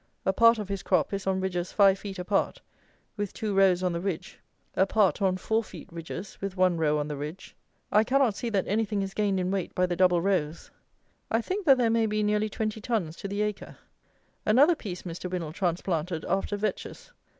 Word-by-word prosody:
A 190 - +2
part 230 +2 +6
of 210 -2 -4
his 195 -1 -3
crop 185 -2 +1
is 195 -1 -3
on 190 0 +1
ridges 180 -2 -2
five 195 -2 +5
feet 195 -2 -7
apart 185 +2 0 0.6
with 205 -2 -3
two 215 -2 -2
rows 190 -2 +4
on 180 -1 +1
the 170 - -3
ridge, 185 -4 -4 0.4
a 190 - +3
part 205 -1 +2
on 185 -1 +2
four 220 +4 0
feet 180 -6 -11
ridges 170 +3 -7
with 195 -1 -4
one 185 -1 +3
row 150 -1 +2
on 150 0 -2
the 150 - -4
ridge. 150 +6 -7 0.4
I 215 - +5
cannot 260 -1 +2
see 235 - -3
that 200 -4 0
anything 210 -1 0
is 195 0 -5
gained 205 -3 +1
in 180 0 -1
weight 195 -3 -3
by 180 - +3
the 180 -1 -2
double 180 -1 +4
rows. 170 -4 -1 0.6
I 225 - +2
think 375 - -3
that 270 -2 +7
there 235 -2 +2
may 225 -1 +2
be 215 0 0
nearly 210 +1 +1
twenty 215 +1 -3
tons 205 -9 -2
to - - -5
the 200 +1 -1
acre. 210 -1 -5 0.7
Another 275 +10 +5
piece 195 - -7
Mr. 180 +1 -6
WINNAL 170 -4 -4
transplanted 170 -2 -2
after 195 +2 -1
vetches. 215 - -4
195 Hz, 210 wpm, -27 LUFS, 180-215 Hz, 0.7 s, that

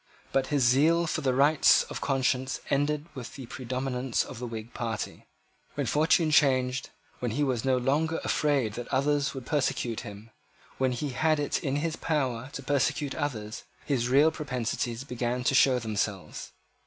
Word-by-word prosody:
But 135 -1 +1
his 145 -3 +1
zeal 155 +8 +4
for 160 - -2
the 130 -2 +1
rights 145 +3 +5
of - - -7
conscience 130 -1 0
ended 145 +2 +1
with 125 -3 -8
the 135 - -7
predominance 130 0 -2
of - - -9
the 125 - -4
Whig 115 0 -7
party. 115 -2 -4 0.5
When - - -1
fortune 155 +1 +3
changed, 130 -4 +3 0.3
when 125 - -1
he 135 +7 0
was 130 -5 0
no 130 -1 +2
longer 150 +6 +1
afraid 140 -8 +1
that 120 +2 -6
others 140 +1 +1
would 130 -2 -6
persecute 130 -6 -1
him, 105 +3 -10 0.5
when 130 -1 +2
he 140 +4 -3
had 155 +4 +1
it 145 - -1
in 135 -1 -1
his 160 +2 -1
power 130 -5 -1
to - - -6
persecute 140 0 0
others, 110 -7 -4 0.2
his 125 -4 0
real 145 +5 +5
propensities 125 -4 -3
began 125 -1 -2
to 130 - +2
show 130 -1 +5
themselves. 105 -7 -3
130 Hz, 165 wpm, -28 LUFS, 120-145 Hz, 0.5 s, rights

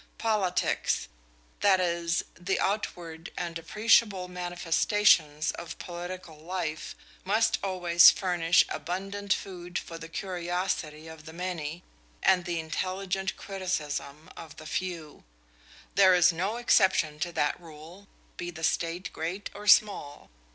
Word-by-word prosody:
Politics 205 -5 0 0.5
that 195 -2 +4
is, 170 -1 0
the 185 +2 -2
outward 170 -5 -3
and 170 -1 -3
appreciable 210 +1 +3
manifestations 175 -2 +2
of 170 - -8
political 175 -2 -7
life 160 -2 -4 0.3
must 215 +4 +2
always 175 -3 +6
furnish 175 -2 +3
abundant 195 +3 -4
food 180 -2 -2
for 165 -1 -6
the 165 0 -9
curiosity 175 -3 -3
of 160 -1 -11
the 160 - -10
many 175 -2 -4 0.4
and 180 -2 +4
the 170 -2 -2
intelligent 185 +4 -3
criticism 155 -6 -4
of 160 -2 -10
the 155 - -10
few. 165 -2 -5 0.7
There 190 -2 +6
is 180 0 +5
no 190 +7 -2
exception 180 -10 +3
to 175 +2 -2
that 150 +3 0
rule, 165 +4 -13 0.3
be 175 - -4
the 165 -2 -9
state 170 +2 -1
great 175 +5 -4
or 210 +1 -9
small. 200 - +3
175 Hz, 125 wpm, -28 LUFS, 165-190 Hz, 0.7 s, always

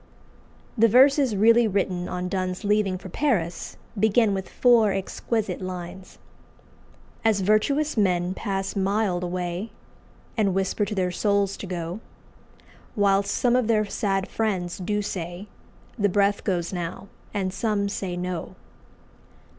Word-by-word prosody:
'" - - -30 0.3
The 230 - +7
verses 265 +1 +5
really 230 +3 +5
written 185 -3 -1
on 180 0 -3
Donne's 185 0 -2
leaving 205 -2 +1
for 190 - -10
Paris 180 - -1 0.2
begin 220 0 +3
with 190 -1 -4
four 235 -4 +4
exquisite 195 +1 -2
lines 185 0 -7 1.1
"As 220 -3 +3
virtuous 275 +10 +2
men 180 -3 +2
pass 195 -1 -3
mild 195 -2 0
away, 180 +3 -3 0.7
And 200 -5 +1
whisper 195 +2 0
to 210 +1 -4
their 180 -2 0
souls 200 +1 +1
to 195 - -7
go, 175 +1 -4 1.0
Whilst 200 -1 +2
some 245 -1 +2
of 250 -3 +2
their 215 -2 +3
sad 195 -2 -1
friends 190 -6 -2
do 205 +3 -1
say, 175 +1 -5 0.5
'The 205 0 +3
breath 200 +1 +2
goes 175 -3 -1
now,' 175 +2 -5 0.2
and 190 -3 -2
some 210 -2 0
say 190 -3 -4
'No! 180 0 -4
195 Hz, 135 wpm, -25 LUFS, 180-215 Hz, 1.1 s, The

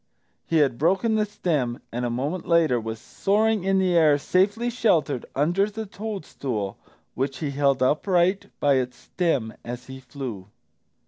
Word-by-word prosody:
He 165 - +2
had 135 -6 +2
broken 190 +8 +2
the 215 -1 +1
stem, 145 -12 -1
and 120 +1 -3
a - - 0
moment 140 +9 -3
later 165 -8 +3
was 110 0 -5
soaring 210 - +1
in 195 0 +2
air 165 -5 +4
safely 205 - +1
sheltered 160 - +1
under 175 +8 +2
the 220 +1 -5
toadstool, 155 - -5 0.3
which 135 +1 -2
he 150 -3 -3
held 140 -2 +2
upright 180 +7 +2
by 140 -2 +3
its 125 -1 -2
stem 140 -11 -1
as 120 +1 -6
he 130 0 -9
flew. 125 -8 -7
155 Hz, 150 wpm, -25 LUFS, 130-195 Hz, 0.3 s, air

